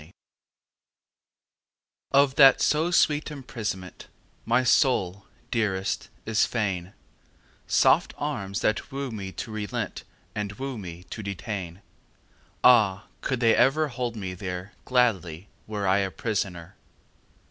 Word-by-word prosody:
XXII 80 +5 -16 2.0
Of 140 -1 +4
that 135 -1 +7
so 155 +3 +2
sweet 155 -3 +2
imprisonment 110 -10 -6 0.4
My 120 +2 +3
soul, 100 -7 +2 0.2
dearest, 100 -4 -1 0.2
is 110 -1 +2
fain 95 -5 -2 0.7
Soft - - +3
arms 100 0 -3
that 110 +6 0
woo 135 -1 -4
me 100 -3 -6
to 115 - -6
relent 105 -2 -4 0.3
And 105 -1 -3
woo 130 +2 -5
me 90 -2 -8
to 110 - -5
detain. 100 -2 -5 0.8
Ah, 105 -5 +5 0.2
could 130 -2 -2
they 115 -1 +5
ever 140 +5 +3
hold 120 -2 -3
me 95 -4 -5
there 90 +1 -6
Gladly 100 -8 +1 0.2
were 105 -2 -2
I 95 +2 +4
a 95 -1 0
prisoner! 95 -6 -4
105 Hz, 120 wpm, -26 LUFS, 95-125 Hz, 2.0 s, that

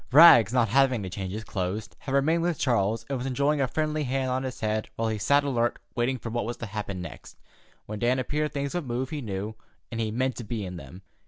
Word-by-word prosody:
Rags, 125 - +9
not 120 -3 +3
having 130 -2 +3
to 95 - -5
change 95 0 -4
his 110 +2 -5
clothes, 100 +1 -3
had 135 0 -3
remained 160 +5 +3
with 170 -2 0
Charles, 115 -4 +1
and 135 -1 -2
was 125 - -3
enjoying 140 +3 +1
a 135 - +2
friendly 155 +2 -1
hand 130 -1 -1
on 130 +1 0
his 130 -2 -5
head 110 0 -1
while 115 0 0
he 110 -1 -2
sat 140 +7 +4
alert 120 -4 0 0.2
waiting 125 +2 0
for 115 -2 -6
what 120 +1 -1
was 120 +1 -4
to 115 - -5
happen 100 -3 -4
next. 85 - -10 0.5
When 105 0 -6
Dan 120 +3 +2
appeared 150 +4 -1
things 140 -1 -3
would 175 -6 -2
move, 125 +2 -2
he 150 -2 -3
knew, 105 -1 -4 0.4
and 115 -1 -2
he 110 - 0
meant 130 +2 -1
to 120 - -5
be 110 -2 -4
in 90 -1 -6
them. 85 +5 -11
120 Hz, 245 wpm, -27 LUFS, 110-135 Hz, 0.5 s, Rags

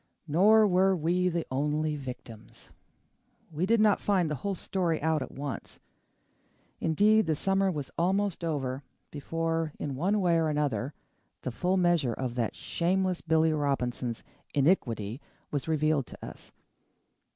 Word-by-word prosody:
Nor 210 +8 +5
were 190 0 +3
we 180 +2 +1
the 170 -1 -2
only 150 +3 0
victims. 125 -5 -9 0.8
We 165 +4 -1
did 230 +1 +3
not 210 -2 +4
find 185 -6 +1
the 145 - -4
whole 200 -1 -1
story 175 -3 -1
out 160 -1 +1
at - - -4
once. 140 0 -6 1.0
Indeed, 205 +5 +3
the 160 - +2
summer 195 +4 +1
was 150 -6 -4
almost 190 +1 0
over 135 -5 -2 0.3
before, 165 +1 -2
in 140 -2 -4
one 190 +9 +1
way 175 -3 +3
or 160 -1 +1
another, 145 -2 -1 0.5
the 130 - -2
full 180 +10 0
measure 175 -9 +2
of 130 -2 -3
that 120 -3 -2
shameless 185 +1 -1
Billy 160 -1 +2
Robinson's 125 -5 -1 0.3
iniquity 125 - +1 0.3
was 145 0 -2
revealed 155 -3 +1
to - - -10
us. - - -11
160 Hz, 140 wpm, -29 LUFS, 140-185 Hz, 1.0 s, Nor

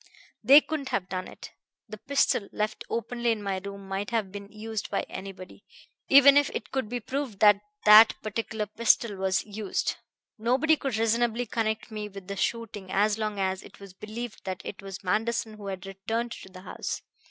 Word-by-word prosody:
They 275 +7 +9
couldn't 295 -4 -4
have 180 -1 -2
done 185 0 -3
it. - - -11 0.4
The 215 - -9
pistol, 275 -6 +1
left 210 0 -2
openly 235 +1 -2
in 215 -2 -2
my 195 -1 -1
room, 200 -1 -8
might 195 +1 -3
have 220 -5 -1
been 200 0 -9
used 220 0 -5
by - - 0
anybody, 190 -1 -9 0.5
even 280 +1 +8
if 290 -1 +4
it - - -5
could 260 -5 -2
be 245 +1 -2
proved 260 -2 -4
that 205 -1 +6 0.2
that 215 +1 +9
particular 215 0 -3
pistol 220 0 +2
was 190 0 0
used. 210 -1 -2 0.4
Nobody 260 +8 +3
could 270 -6 -3
reasonably 230 +1 +1
connect 220 0 -2
me 210 -1 -5
with 195 -2 -11
the 200 - -4
shooting 210 -1 -3
so 205 +3 +1
long 215 -1 -2
as 190 -1 -1
it - - -15
was 200 -2 -12
believed 215 +3 -7
that 185 0 -5
it 195 - -7
was 195 0 -8
Manderson 220 +3 0
who 210 -2 -9
had 190 0 -5
returned 220 +5 -3
to 190 - -9
the 185 0 -12
house. - - -5
215 Hz, 185 wpm, -27 LUFS, 195-235 Hz, 0.5 s, They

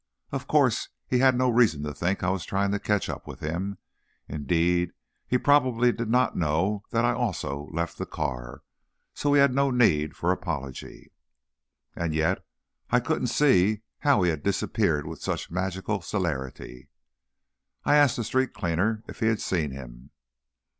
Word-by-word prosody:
Of - - -4
course, - - +2 0.2
he 125 - +1
had 130 -1 +5
no 130 0 +2
reason 115 -11 +3
to 75 0 -4
think 90 +8 -1
I 90 - +2
was 95 -2 -2
trying 100 +1 0
to 100 - 0
catch 105 0 0
up - - -6
with - - -8
him, 90 +6 -3 0.5
indeed, 85 +4 0 0.3
he 125 - +2
probably 125 -4 +3
did 115 -1 -4
not 125 +2 +2
know 90 +6 0
that - - +1
I - - +3
also 70 +2 -3
left 85 +1 -3
the - - -3
car, 65 +3 -4 0.5
so 145 - 0
he 145 - +6
had 140 -2 +5
no 140 +1 +2
need 80 - +2
for 85 - 0
apology. 70 -8 -5 0.8
And 85 -2 -2
yet, 80 +4 +1 0.5
I 125 - +4
couldn't 130 +1 -1
see 110 -6 +3 0.2
how 140 -10 +3
he 90 - +3
had 80 -2 -4
disappeared 75 0 0
with - - -8
such - - -3
magical 95 +3 -2
celerity. 70 -7 -4 1.0
I 145 - +4
asked 145 -4 +4
a 120 - -1
street 130 +3 0
cleaner 95 +6 0
if - - -10
he 110 - +1
had 110 -1 +2
seen 80 -5 -1
him. 65 -1 -10
95 Hz, 165 wpm, -26 LUFS, 80-120 Hz, 1.0 s, he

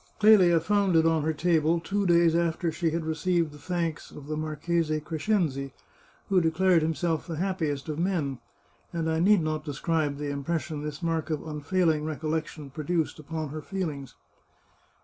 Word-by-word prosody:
Clelia 195 -6 +6
found 200 +1 +1
it 160 0 +5
on 165 -1 +3
her 155 +2 0
table, 160 +1 +2
two 195 +4 -1
days 170 -1 +5
after 170 0 0
she 165 0 0
had 160 0 -2
received 165 0 0
the 150 - -13
thanks 170 0 -3
of 145 - -11
the 155 +1 -3
Marchese 155 +1 -1
Cres 155 +3 -6
cenzi, 140 -11 0 0.5
who 190 -2 +3
declared 170 +1 +3
himself 160 +1 -1
the 165 - -4
happiest 160 -5 -2
of 155 0 -3
men; 165 -8 -1 0.5
and 165 -1 -2
I 160 0 +1
need 195 0 +4
not 155 -1 -2
describe 150 0 -1
the 145 0 -3
impression 155 +2 -3
this 150 +1 -6
mark 165 -1 -1
of 155 -1 -2
unfailing 155 +1 0
recollec 155 0 -2
tion 145 -4 -10
produced 160 +2 -2
upon 155 0 -5
her 155 +2 -6
feelings. 150 -7 -5
160 Hz, 170 wpm, -27 LUFS, 150-170 Hz, 0.5 s, Clelia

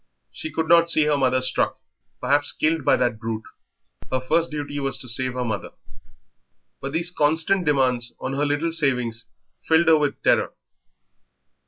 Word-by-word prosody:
She 155 - -7
could 160 -1 -2
not 170 0 +5
see 155 -2 +4
her 150 0 +1
mother 130 -2 +1
struck, 130 - +1 0.4
perhaps 145 +3 +2
killed 155 -1 0
by - - +4
that 120 -3 -1
brute; 110 -1 -4 0.7
her 130 - 0
first 165 +6 0
duty 145 -1 -5
was 135 -1 +1
to 125 - -7
save 130 +2 +1
her 125 -1 -2
mother, 110 -3 -5 1.1
but 135 - -5
these 170 +3 -1
constant 160 +4 +1
demands 125 -5 +1
on 130 - -4
her 140 +2 -1
little 145 +3 -1
savings 125 -7 -1 0.4
filled 160 +1 +2
her 160 -1 +6
with 145 -2 -1
terror. - - +2
145 Hz, 165 wpm, -23 LUFS, 125-160 Hz, 1.1 s, her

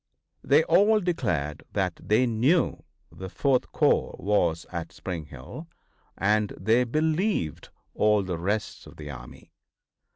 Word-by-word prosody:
They 470 - +4
all 215 - +4
declared 80 - -2
that 95 -4 -1
they 110 +4 +2
knew 125 +9 +1 0.3
the 95 +3 -8
Fourth 130 +4 0
corps - - +2
was 85 -5 0
at 85 -2 -5
Spring 85 -5 -6
Hill, 70 - -10 0.5
and 105 +1 +1
they 115 +6 +3
believed 155 - -1 0.2
all 105 -1 +3
the 90 -3 -4
rest 105 +5 -3
of - - -15
the 75 -1 -7
army. - - -12
105 Hz, 130 wpm, -26 LUFS, 85-135 Hz, 0.5 s, They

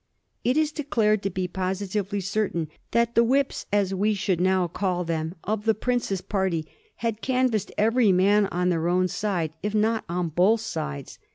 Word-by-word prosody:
It 250 +4 +2
is 310 -1 +2
declared 225 -9 +1
to 195 - -1
be 185 0 -2
positively 195 +2 -2
certain 190 -5 -1 0.2
that 235 0 +1
the 235 - +5
"whips," 270 +3 0
as 200 -2 +1
we 205 +3 +1
should 185 -3 0
now 185 -1 +2
call 180 +1 -1
them, 165 0 -3
of 210 0 -2
the 220 -1 +3
prince's 225 -4 -1
party 190 -6 -1 0.4
had 225 -1 -1
canvassed 255 -5 0
every 225 0 +4
man 200 +3 +4
on 180 0 0
their 165 -1 0
own 180 +1 +2
side, 175 -6 -2
if 210 +1 -2
not 220 +1 +2
on 175 0 -1
both 190 +8 +3
sides. 70 - -5
200 Hz, 175 wpm, -25 LUFS, 180-220 Hz, 0.4 s, the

